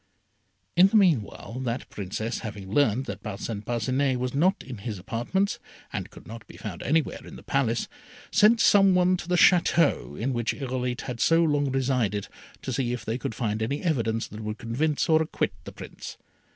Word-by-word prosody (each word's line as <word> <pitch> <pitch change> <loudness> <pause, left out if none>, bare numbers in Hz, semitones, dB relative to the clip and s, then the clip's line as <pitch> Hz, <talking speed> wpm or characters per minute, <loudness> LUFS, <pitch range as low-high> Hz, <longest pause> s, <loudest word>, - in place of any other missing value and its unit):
In 180 +2 +7
the 195 - -2
meanwhile 130 - +1
that 125 -1 -3
Princess 105 +4 -4
having 100 -4 -7
learned 130 -2 +2
that - - -6
Parcin 105 0 -5
Parcinet 130 +4 0
was 125 0 -2
not 180 +8 +2
in 125 -5 -8
his 105 0 -5
apartments, 120 - -1 0.3
and - - -4
could - - -14
not 115 +1 -10
be - - -13
found 95 -6 -7
anywhere 160 +1 0
in - - -11
the - - -12
Palace, 120 -4 0 0.4
sent 220 +2 +5
some 195 -4 +5
one 180 0 +4
to 175 - -8
the 180 - +1
Château 170 - +3
in 130 +4 -1
which 120 -1 -1
Irolite 125 -2 -3
had 125 -2 -6
so 165 +9 +4
long 145 -3 +1
resided, 125 -6 0 0.4
to 130 - -3
see 120 0 -1
if 120 -3 -5
they 115 +3 -2
could 115 - -4
find 110 -4 -2
any 140 +9 -2
evidence 115 -9 0
that 105 - -8
would 105 0 -4
convict 130 +6 -1
or 160 -1 +4
acquit 160 - -1
the - - -7
Prince. - - -9
125 Hz, 190 wpm, -26 LUFS, 110-155 Hz, 0.4 s, In